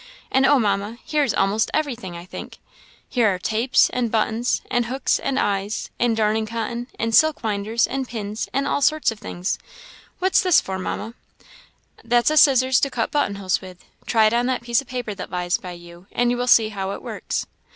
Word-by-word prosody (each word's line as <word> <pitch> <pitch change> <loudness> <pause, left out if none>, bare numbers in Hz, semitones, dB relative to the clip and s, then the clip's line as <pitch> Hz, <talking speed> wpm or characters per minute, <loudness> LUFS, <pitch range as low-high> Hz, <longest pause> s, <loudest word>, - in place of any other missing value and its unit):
And 265 +1 +4
oh, 290 - +5
Mamma! 205 0 -1
here 300 -1 +1
is 265 - 0
almost 200 +3 +1
everything, 245 - -3
I 170 - -9
think - - -9 0.5
here 240 -4 +2
are 185 - -2
tapes, 225 +7 +2
and 245 -2 -1
buttons, 225 +2 0
and 240 -1 +1
hooks 260 +3 0
and 270 - -2
eyes, 205 -1 -1
and 235 -2 +2
darning 220 0 +1
cotton, 230 +2 -4
and 225 0 -1
silk 315 +3 +4
winders, 215 +2 0
and 265 0 -3
pins, 215 -3 -5
and 275 +1 0
all - - 0
sorts 310 -2 +2
of 220 - -9
things. 180 0 -3 0.6
What's 375 +1 +3
this 365 -4 +5
for, 190 0 -5
Mamma?" 215 +4 -4 0.9
"That's 240 +4 +3
a 310 - +1
scissors 260 -3 +5
to 275 - +1
cut 235 -4 -2
button 290 -9 0
holes 195 -2 -1
with. 185 -2 -12 0.2
Try 225 -2 +4
it 215 - +3
on 240 +1 +2
that 255 -2 -1
piece 235 0 +1
of 275 - -17
paper 245 -4 -4
that 195 - -7
lies 180 0 -1
by 180 -2 -8
you, 175 +1 -14
and 245 0 +1
you 245 - -1
will 245 0 -2
see 225 -3 +5
how 195 -2 -4
it - - -8
works." - - -4
230 Hz, 205 wpm, -22 LUFS, 200-250 Hz, 0.9 s, oh